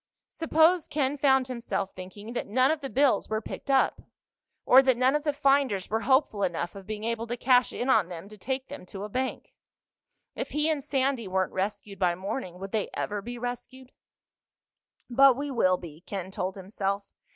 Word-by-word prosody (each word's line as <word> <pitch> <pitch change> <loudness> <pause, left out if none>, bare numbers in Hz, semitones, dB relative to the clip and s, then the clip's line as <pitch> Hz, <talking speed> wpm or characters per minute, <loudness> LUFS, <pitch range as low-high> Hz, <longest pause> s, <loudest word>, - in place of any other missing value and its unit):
Suppose, 325 +1 +3
Ken 285 -1 0
found 265 -2 +3
himself 235 -6 -3
thinking, 205 +5 -9
that - - -3
none 255 +6 +3
of 315 -1 -2
the 270 - -5
bills 275 +1 +2
were 215 0 0
picked 225 - -8
up? 270 -1 +3 0.6
Or 260 - +8
that 260 -2 +2
none 255 +2 +3
of 300 - +1
the 295 0 0
finders 275 -9 +1
were 220 - +1
hopeful 260 -3 +2
enough 175 -2 -1
of 195 -2 -11
being 215 0 -5
able 230 0 -2
to 240 +1 -3
cash 250 0 +4
in 245 - -3
on 260 -9 +3
them 175 +1 -8
to 215 - -11
take 260 +6 -4
them 285 - -8
to 195 +1 -7
a 210 - -5
bank? 260 +4 -3 0.8
If - - -4
he 300 +1 +1
and 290 -3 -2
Sandy 265 -5 0
weren't 185 0 -1
rescued 200 +1 -3
by 180 -2 +2
morning, 185 0 -5
would 195 +1 -7
they 215 -2 -1
ever 205 -1 -2
be 240 +4 -7
rescued? 245 +2 -6 1.2
But 270 +1 +6
we 285 0 -3
will 185 -7 +3
be, 165 -3 -11
Ken 190 -1 -6
told 185 0 -3
himself. 195 +1 -3
235 Hz, 195 wpm, -28 LUFS, 195-270 Hz, 1.2 s, Or